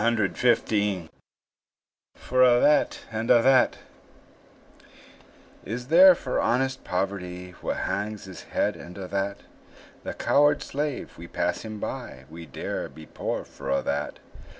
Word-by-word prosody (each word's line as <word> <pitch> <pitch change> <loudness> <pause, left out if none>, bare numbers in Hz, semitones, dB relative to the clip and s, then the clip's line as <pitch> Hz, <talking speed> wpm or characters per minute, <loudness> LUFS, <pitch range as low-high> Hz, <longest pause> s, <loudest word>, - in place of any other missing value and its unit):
WOODWORTH 105 -4 +1 1.1
FOR 130 0 0
A' 125 -1 +6
THAT 150 +3 +3
AND 110 +1 -3
A' 115 - +6
THAT 130 0 +4 1.9
Is 125 +5 -5
there 180 +3 +8
for 130 -6 -2
honest 130 +2 0
poverty 90 -1 -3
Wha - - -2
hangs 105 +1 -3
his 95 -3 -10
head, - - 0
and 85 +6 -11
a' 95 -2 -6
that? 100 +1 -2 0.6
The - - -5
coward 145 0 +3
slave, 145 0 -4
we - - -8
pass - - -1
him 110 -1 -7
by; 65 -8 -6
We 85 0 -9
dare - - -4
be 80 - -12
poor - - -4
for 70 -1 -9
a' 70 - +1
that. 70 +1 -2
105 Hz, 135 wpm, -26 LUFS, 90-125 Hz, 1.9 s, there